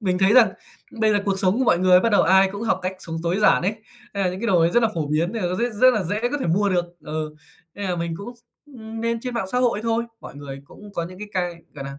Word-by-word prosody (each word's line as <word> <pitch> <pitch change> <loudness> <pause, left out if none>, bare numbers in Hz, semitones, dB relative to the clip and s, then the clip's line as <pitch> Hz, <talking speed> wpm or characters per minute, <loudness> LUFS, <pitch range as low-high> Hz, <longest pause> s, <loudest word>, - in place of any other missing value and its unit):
mình 185 -4 0
thấy 195 +2 +4
rằng 230 -6 +6 0.5
bây 220 -1 +4
giờ 205 - +3
cuộc 195 -1 0
sống 190 +3 +2
của 260 - +2
mọi 175 - +3
người 180 0 +5
bắt 230 - +2
đầu - - +5
ai 190 +2 +5
cũng 200 +2 -6
học 215 -5 +1
cách 185 - -2
sống 165 -4 -6
tối 175 +2 0
giản 210 - +4
ấy, 200 +4 0 0.4
hay 200 - -1
là 180 - +1
những 185 +1 -7
cái 235 - -2
đồ 185 -6 +3
ấy 165 +1 +3
rất 240 +3 +3
là 225 - +3
phổ 160 -3 -2
biến 160 +6 0
nên 225 - -3
là 175 - 0
nó 180 - -2
sẽ 240 +1 0
rất 255 0 +7
là 215 - 0
dễ 205 +5 -2
có 290 +4 0
thể - - -1
mua 200 +5 +2
được. 175 -2 +1 0.2
Ừ, 155 0 -5 0.4
nên 205 - -6
là 180 - -1
mình 170 -1 -3
cũng, 200 +5 -8 0.4
ưm, 225 -5 -9
nên 230 0 -1
trên 250 0 -5
mạng 225 -5 -2
xã 250 - +2
hội 240 -4 +1
thôi, 230 0 0 0.2
mọi - - -10
người 140 -1 -8
cũng 205 +7 -14
có 170 -3 -2
những 185 +1 -12
cái 210 - -7
cai, 175 -2 -3
gọi 140 -2 -7
nà, 140 0 -8
195 Hz, 310 wpm, -23 LUFS, 175-225 Hz, 0.5 s, rất